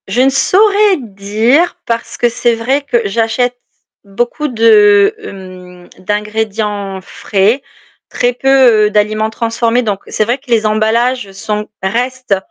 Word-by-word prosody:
Je 245 - 0
ne 265 - +4
saurais 400 +7 +3
dire, 225 - 0
parce 230 0 -4
que 240 - +2
c'est 235 0 0
vrai 260 +5 -1
que 245 -4 -1
j'achète 230 +4 -1 0.5
beaucoup 240 +9 -3
de, 210 -4 +4
hem, 180 -2 -11
d'ingrédients 210 -1 -3
frais, 200 +6 -1 0.5
très 245 0 0
peu, 250 -4 +4
heu, - - -2
d'aliments 215 +1 0
transformés, 230 +2 -1
donc 205 -4 -2
c'est - - -1
vrai 240 +4 -1
que 265 -1 -23
les 225 -2 +2
emballages 220 +1 0
sont 210 +2 -4 0.2
restent, 245 +2 -1
225 Hz, 135 wpm, -13 LUFS, 205-250 Hz, 0.5 s, ne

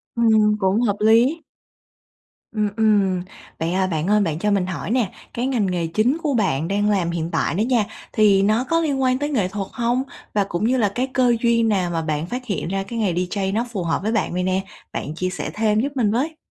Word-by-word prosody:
Ừm, 220 -2 +4
cũng 195 +3 +2
hợp 205 -4 +1
lí. 235 +9 +4 1.1
Ừm, 210 -1 0
ừm. 200 -4 +2 0.4
Vậy, 165 +1 -1
à, 190 0 +1
bạn 160 -2 -2
ơi, 210 0 +4
bạn 160 -5 -1
cho 210 +3 0
mình 195 -3 +1
hỏi 185 +3 -5
nè, 235 -6 +1 0.2
cái 245 +2 -1
ngành 240 -7 +1
nghề 175 -3 -1
chính 215 - +1
của 290 -4 0
bạn 165 - 0
đang 205 +1 +1
làm 180 -4 +1
hiện 170 0 -3
tại - - 0
đó 200 - -1
nha, 235 -3 +2 0.3
thì 200 -2 +4
nó 215 +5 +2
có 330 +4 +1
liên 280 -4 0
quan 255 0 +2
tới 290 +1 -2
nghệ 205 -10 +1
thuật 195 0 -4
hông? 240 +1 0 0.3
Và 205 - +2
cũng 185 +1 -3
như 255 +3 +2
là 205 -5 +1
cái 255 +2 0
cơ 250 -2 +3
duyên 230 -1 +3
nào 185 -4 +1
mà 165 -1 -1
bạn 155 0 -2
phát 250 +5 -5
hiện 190 -5 -3
ra 195 +1 -1
cái 230 +4 -6
nghề 200 -5 +1
DJ 190 +2 -2
nó 235 +2 0
phù 190 -6 -3
hợp 165 +3 -1
với 220 +2 -1
bạn 225 - 0
vậy 180 +1 -1
nè? 185 +1 0 0.3
Bạn 150 +3 -4
chia 185 +2 -2
sẻ 180 - -4
thêm 215 0 +2
giúp 280 +3 -2
mình 220 -5 +2
với. 310 +7 -1
210 Hz, 240 wpm, -21 LUFS, 185-235 Hz, 1.1 s, Ừm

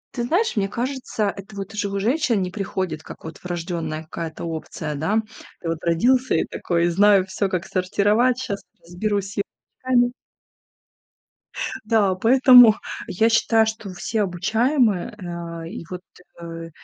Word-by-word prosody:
Ты 240 - -2
знаешь, 355 - +1
мне 195 -2 +1
кажется, 240 -4 -2
это 200 +1 -11
вот 200 +2 -6
уже 205 -1 -2
у 200 - -3
женщин 240 +1 +1
не 180 - -4
приходит, 185 -5 -3
как - - -12
вот 160 - -8
врождённая 165 -3 -4
какая-то 165 0 -6
опция, 160 -2 -5
да. 200 +10 0 0.4
Ты 165 - -4
вот 165 -1 -2
родился 245 +10 +2
и - - +1
такой, 170 -1 -1
знаю 195 +2 +5
всё, 190 +1 -2
как 185 -2 -2
сортировать, 210 +7 +2
щас 200 -6 -4 0.2
разберусь 200 +3 -2
с - - -12
е 200 - +1 0.4
руками. 245 -1 +3 1.7
Да, 210 -4 +3
поэтому 245 +1 +7 0.3
я 220 +5 +2
считаю, 225 0 +3
что 220 -2 -5
все 215 +4 -2
обучаемые, 215 - +1
а, 170 -2 -6
и 195 0 -7
вот, 180 -1 -6 0.4
э, 165 0 -7
200 Hz, 150 wpm, -22 LUFS, 175-225 Hz, 1.7 s, поэтому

